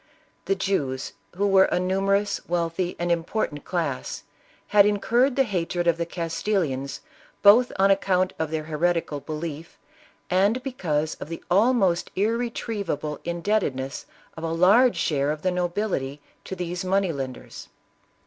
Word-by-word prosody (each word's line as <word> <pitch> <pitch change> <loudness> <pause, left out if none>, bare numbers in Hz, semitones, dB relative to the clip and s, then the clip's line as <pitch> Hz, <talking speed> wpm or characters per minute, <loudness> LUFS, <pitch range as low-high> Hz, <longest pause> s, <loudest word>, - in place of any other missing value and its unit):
The 195 +2 +1
Jews, 145 - -2 0.2
who 200 +3 0
were 195 -1 +6
a - - 0
numerous, 195 +2 +1
wealthy 175 +1 -1
and 175 0 -1
impor 170 +6 0
tant 145 -1 -10
class, 160 -8 -3 0.5
had 205 -1 +7
incurred 240 +6 +2
the 270 - +4
hatred 175 -5 -2
of 170 -1 +3
the 170 0 -2
Cnstilians, 165 -5 -2 0.4
both 225 +5 +7
on 195 +1 +4
account 185 -1 +2
of 160 -1 -1
their 155 0 -2
heretical 160 -1 -1
belief, 155 +1 -6 0.5
and 200 +7 +2
bcc.iuse 155 - -2
of - - -6
the 165 - -7
almost 195 -3 +3
irretrievable 205 -8 -2
indebtedness 170 -7 -2 0.3
of 160 - -8
a 165 - -2
large 200 +9 +5
share 140 -2 0
of 150 0 -3
the 185 - +2
nobility 175 -6 -2 0.3
to 190 - -5
these 180 0 -4
money 190 -1 +1
lenders. 130 -3 -7
180 Hz, 140 wpm, -25 LUFS, 160-200 Hz, 0.5 s, had